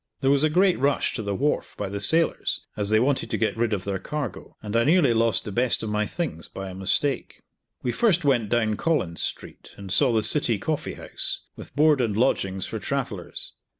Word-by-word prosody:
There 135 0 +3
was 140 +1 +3
a 155 - +4
great 180 +3 +3
rush 140 +1 +1
to 115 - -3
the 100 -2 -3
wharf 145 +8 -1
by 105 - -3
the 100 +1 -4
sailors, 160 +11 +2
as 105 -1 -1
they 110 0 +4
wanted 130 +3 0
to - - -1
get 110 -3 0
rid 115 0 0
of 100 -3 -1
their 100 -1 -3
cargo, 135 0 -6
and 105 +1 -5
I 115 - +4
nearly 150 -3 +4
lost 115 -2 +2
the 105 - -5
best 120 +3 +1
of 110 - -3
my 105 0 0
things 160 - -4
by 95 -1 -7
a - - -9
mistake. 95 +9 -1 0.4
We 125 - 0
first 180 - +2
went 120 -7 +2
down 110 -2 +1
Collins 150 - 0
street, - - -3
and 100 -2 -8
saw 135 +4 +4
the 110 -2 +1
City 120 -1 +3
Coffee 155 +9 -3
House, - - -3
with - - -12
board 150 -2 +4
and 110 -4 -1
lodgings 95 -6 +1
for - - -5
travellers. - - -4
115 Hz, 220 wpm, -25 LUFS, 100-145 Hz, 0.4 s, a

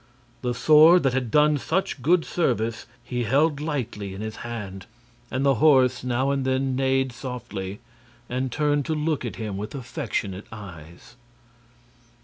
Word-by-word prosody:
The 125 -1 -2
sword 155 +5 +6
that 135 -2 +2
had 125 -3 -1
done 150 +2 +4
such 160 -2 -2
good 165 +5 +3
service 115 - -1 0.2
he 120 0 -3
held 145 +5 +2
lightly 120 -10 -4
in 100 - -7
his 110 0 -5
hand, 105 -6 -7 0.4
and 130 +1 -1
the 140 - +5
horse 130 -5 +4
now 125 +2 0
and 140 -1 0
then 130 0 0
neighed 135 0 +1
softly 105 -6 -6 0.5
and 130 +1 -2
turned 145 +1 +1
to 160 - 0
look 150 -1 -1
at - - -5
him 105 -4 -4
with 105 +7 -6
affectionate 105 -6 -4
eyes. 90 0 -11
130 Hz, 150 wpm, -24 LUFS, 110-145 Hz, 0.5 s, sword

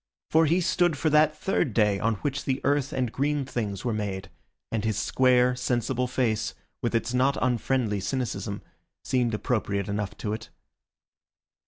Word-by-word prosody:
For 160 0 +5
he 170 +4 +3
stood 175 -2 +2
for 155 +1 +1
that 155 0 +4
third 150 - 0
day 105 -3 +3
on 115 +1 +1
which 140 -1 -2
the 130 -1 0
earth 140 -1 +1
and 125 -3 -1
green 145 +1 0
things 105 -6 -3
were 120 - 0
made, 95 -3 -4 0.4
and 110 -2 -1
his 110 -2 0
square, 125 +2 +3
sensible 125 0 0
face, 120 -4 0 0.3
with 120 0 -1
its 115 +1 0
not 130 +2 +2
unfriendly 120 -3 +1
cynicism, 110 -2 -3 0.4
seemed 120 -3 +1
appropriate 100 -4 -1
enough 105 0 -3
to 105 -2 -3
it. 110 +1 -6
125 Hz, 160 wpm, -27 LUFS, 105-135 Hz, 0.4 s, For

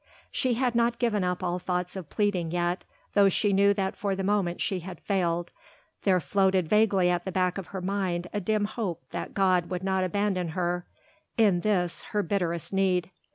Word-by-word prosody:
She 255 -2 +1
had 250 0 +1
not 235 0 +2
given 220 -5 +1
up 180 0 -1
all 180 0 -1
thoughts 180 0 -2
of 185 -6 -7
pleading 200 -6 0
yet; 175 +1 -1 0.3
though 200 -1 +6
she 200 +2 +1
knew 200 +1 +5
that 190 -1 -1
for 200 -3 -1
the 195 - -3
moment 190 -3 0
she 190 - -1
had 180 +1 -8
failed, 175 -3 -1 0.5
there 185 -2 +4
floated 190 -2 +2
vaguely 195 -3 +3
at 175 -1 0
the 190 - -4
back 185 0 0
of 185 - -7
her 190 +1 -6
mind 185 -2 -1
a 205 - -1
dim 210 +2 +1
hope 205 - -4
that 170 - -5
God 185 -3 +2
would 180 0 -3
not 190 -1 +1
abandon 185 -2 0
her 175 0 -1 0.5
in 205 -6 +4
this 180 -3 0 0.2
her 205 - +3
bitterest 170 -2 -1
need. 185 -2 +1
190 Hz, 195 wpm, -27 LUFS, 175-205 Hz, 0.5 s, though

